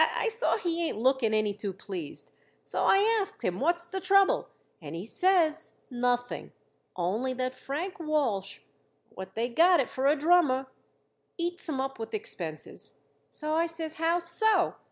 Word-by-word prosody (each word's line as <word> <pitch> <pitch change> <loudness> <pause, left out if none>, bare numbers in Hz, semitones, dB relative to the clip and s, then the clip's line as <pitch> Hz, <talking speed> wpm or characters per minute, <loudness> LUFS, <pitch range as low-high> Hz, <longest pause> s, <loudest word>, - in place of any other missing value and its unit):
I 455 - +1
saw 455 +2 +1
he 340 -4 -1
ain't - - -5
looking 255 -1 +2
any 215 -1 +1
too 200 -1 -5
pleased, 185 -5 -7 0.3
so - - -1
I 435 +3 +4
asked 405 +1 -7
him 180 0 -1
what's 345 +5 +1
the 380 +2 -4
trouble; 395 +7 +4 0.3
and 150 0 -7
he 175 +4 -5
says, 350 - +2 0.2
nothing, 245 0 -1 0.5
only 210 +9 -1
that 255 0 -2
Frank 305 +9 -5
Walsh, 250 - -1 0.5
what 190 0 -9
they 230 +2 0
got 335 +8 +5
it 270 - 0
for 265 +1 0
a 290 - +5
drummer, 300 -4 +3 0.7
eats 345 0 -3
'em 275 -4 -2
up 270 -1 -3
with 225 - -4
expenses. 170 - -5 0.4
So 305 0 -3
I 330 +1 +2
says, 325 -1 -5
How 330 +2 +1
so? 355 +3 +2
300 Hz, 160 wpm, -29 LUFS, 230-350 Hz, 0.7 s, got